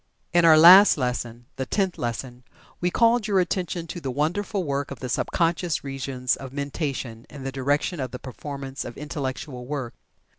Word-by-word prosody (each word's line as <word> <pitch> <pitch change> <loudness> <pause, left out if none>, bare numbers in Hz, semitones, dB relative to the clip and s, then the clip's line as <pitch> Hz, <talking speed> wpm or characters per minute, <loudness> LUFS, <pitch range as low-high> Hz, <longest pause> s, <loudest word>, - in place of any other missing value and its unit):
In 175 -1 +5
our 160 -1 +8
last 180 +5 +9
lesson 120 -2 -3
(the 130 -1 -3
Tenth 190 +2 -1
Lesson) 120 +1 -4 0.4
we 180 - +1
called 230 +2 +3
your 200 -3 +3
attention 175 -1 -1
to 170 +1 -7
the 135 - -4
wonderful 175 - -1
work 140 -2 -2
of 135 - -8
the 130 - -5
sub - - 0
conscious 170 -1 0
regions 135 -2 -2
of 135 -2 -9
mentation 140 -5 -4
in 140 -2 -10
the 135 - -3
direction 145 +5 -1
of 130 -2 -3
the 125 - -7
performance 135 +1 -7
of 120 - -9
Intellectual 135 -3 -5
work. 135 -4 -4
140 Hz, 180 wpm, -25 LUFS, 130-170 Hz, 0.4 s, last